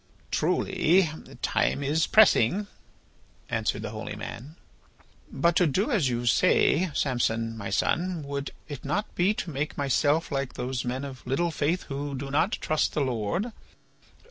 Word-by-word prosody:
"Truly 170 Hz, 0 st, +2 dB, 0.3 s
time 140 Hz, -, +1 dB
is 155 Hz, +4 st, +1 dB
pressing," 205 Hz, -, +5 dB, 0.8 s
answered -, -, -1 dB
the -, -, -4 dB
holy -, -, -6 dB
man. 130 Hz, +7 st, -8 dB, 0.8 s
"But 170 Hz, +5 st, +2 dB
to 180 Hz, -, +4 dB
do 195 Hz, -, 0 dB
as 180 Hz, -, +2 dB
you 120 Hz, 0 st, -2 dB
say, 180 Hz, +5 st, +3 dB
Samson, 115 Hz, -4 st, 0 dB
my 100 Hz, -3 st, -5 dB
son, 175 Hz, -2 st, 0 dB
would 140 Hz, 0 st, -4 dB, 0.2 s
it 145 Hz, -4 st, -7 dB
not 205 Hz, +3 st, -2 dB
be 190 Hz, +4 st, +2 dB
to 170 Hz, -, -4 dB
make 145 Hz, +2 st, -3 dB
myself 145 Hz, +4 st, +1 dB
like 135 Hz, -2 st, -2 dB
those 125 Hz, 0 st, -3 dB
men 130 Hz, +3 st, -3 dB
of 130 Hz, -2 st, -8 dB
little 165 Hz, +7 st, +1 dB
faith 160 Hz, +4 st, 0 dB
who 140 Hz, 0 st, -4 dB
do 135 Hz, +1 st, -5 dB
not 160 Hz, +8 st, +2 dB
trust 155 Hz, 0 st, 0 dB
the 150 Hz, -, 0 dB
Lord? 130 Hz, -, -1 dB
145 Hz, 150 wpm, -27 LUFS, 130-170 Hz, 0.8 s, pressing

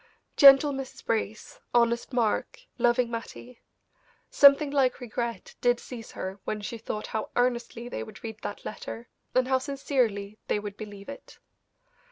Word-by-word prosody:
Gentle 280 Hz, 0 st, +8 dB
Mrs. 270 Hz, -1 st, -7 dB
Brace, 220 Hz, -1 st, -3 dB, 0.2 s
honest 235 Hz, +1 st, +2 dB
Mark, 240 Hz, -, 0 dB, 0.2 s
loving 240 Hz, 0 st, +2 dB
Mattie 235 Hz, +1 st, -8 dB, 0.7 s
something 280 Hz, +1 st, +6 dB
like 270 Hz, -3 st, +2 dB
regret 235 Hz, 0 st, -4 dB
did 245 Hz, -1 st, +3 dB
seize 235 Hz, -3 st, -9 dB
her 190 Hz, +1 st, -5 dB
when 215 Hz, -, -3 dB
she 225 Hz, +3 st, -6 dB
thought 215 Hz, -1 st, -4 dB
how 220 Hz, -1 st, -4 dB
earnestly 240 Hz, -1 st, 0 dB
they -, -, -5 dB
would 215 Hz, -3 st, -10 dB
read 220 Hz, -1 st, -6 dB
that 205 Hz, -, -6 dB
letter, 230 Hz, +2 st, -7 dB, 0.3 s
and 255 Hz, 0 st, +3 dB
how 260 Hz, 0 st, +3 dB
sincerely 250 Hz, -7 st, -1 dB
they -, -, +1 dB
would 205 Hz, -1 st, -6 dB
believe 205 Hz, -2 st, -9 dB
it. 280 Hz, -, -10 dB
235 Hz, 150 wpm, -27 LUFS, 215-255 Hz, 0.7 s, Gentle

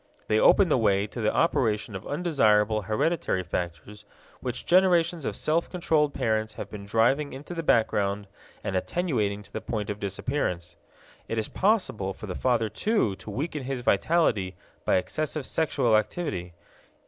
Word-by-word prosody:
They 110 Hz, -, +3 dB
open 195 Hz, -, +6 dB
the 135 Hz, -, +3 dB
way 100 Hz, -2 st, +2 dB
to 115 Hz, +3 st, -6 dB
the 110 Hz, -, +2 dB
operation 115 Hz, -9 st, +1 dB
of 95 Hz, -, -7 dB
undesirable 110 Hz, -10 st, +2 dB
hereditary 110 Hz, -, 0 dB
factors 85 Hz, +4 st, -5 dB, 0.4 s
which 125 Hz, -2 st, -5 dB
generations 175 Hz, -3 st, +3 dB
of -, -, -2 dB
self 165 Hz, +2 st, 0 dB
controlled 155 Hz, -5 st, +1 dB
parents 110 Hz, -3 st, -1 dB
have -, -, -7 dB
been 100 Hz, -1 st, -8 dB
driving 125 Hz, +7 st, +2 dB
into 145 Hz, +6 st, -8 dB
the 165 Hz, -, -3 dB
background 105 Hz, -7 st, +1 dB, 0.4 s
and 95 Hz, -, -2 dB
attenuating 105 Hz, -, -1 dB
to -, -, -22 dB
the -, -, -4 dB
point 105 Hz, -3 st, -3 dB
of 105 Hz, -, -6 dB
disappearance. 100 Hz, -3 st, -2 dB, 0.5 s
It 115 Hz, -, -3 dB
is 110 Hz, -, -1 dB
possible 185 Hz, -, 0 dB
for -, -, -8 dB
the 95 Hz, -, -4 dB
father, 120 Hz, +1 st, +1 dB
too, 110 Hz, -, 0 dB
to 100 Hz, +2 st, -10 dB
weaken 145 Hz, +5 st, -3 dB
his 130 Hz, -1 st, -3 dB
vitality 115 Hz, -, +2 dB, 0.3 s
by -, -, +3 dB
excessive 155 Hz, +8 st, -2 dB
sexual 135 Hz, -8 st, +1 dB
activity. 105 Hz, -, -2 dB
110 Hz, 160 wpm, -27 LUFS, 105-155 Hz, 0.5 s, open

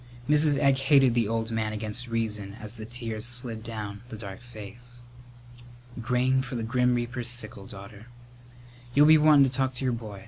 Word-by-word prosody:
Mrs. 150 Hz, -1 st, +3 dB
Egg 135 Hz, -1 st, +3 dB
hated 135 Hz, -2 st, +4 dB
the 115 Hz, -3 st, +1 dB
old 115 Hz, +1 st, -2 dB
man 110 Hz, -1 st, -1 dB
against 110 Hz, +3 st, -2 dB
reason 105 Hz, -3 st, -3 dB
as 105 Hz, +2 st, -7 dB
the 110 Hz, -1 st, -8 dB
tears 115 Hz, -3 st, -5 dB
slid 120 Hz, -2 st, -3 dB
down 105 Hz, -3 st, -6 dB
the 110 Hz, -, -7 dB
dark 100 Hz, -2 st, -8 dB
face. 120 Hz, +1 st, -11 dB, 1.0 s
"Grain 125 Hz, +2 st, +2 dB
for 130 Hz, -1 st, -6 dB
the 115 Hz, -, -2 dB
grim 125 Hz, +2 st, +2 dB
reaper's 120 Hz, 0 st, -1 dB
sickle, 110 Hz, -4 st, -2 dB
daughter. 100 Hz, +3 st, -11 dB, 0.9 s
You'll 145 Hz, +1 st, +7 dB
be 155 Hz, 0 st, +7 dB
wantin' 150 Hz, -2 st, +6 dB
to -, -, -3 dB
talk 130 Hz, -1 st, 0 dB
to 130 Hz, -, -3 dB
your 125 Hz, -, +1 dB
boy. 110 Hz, -4 st, -7 dB
120 Hz, 180 wpm, -27 LUFS, 110-130 Hz, 1.0 s, You'll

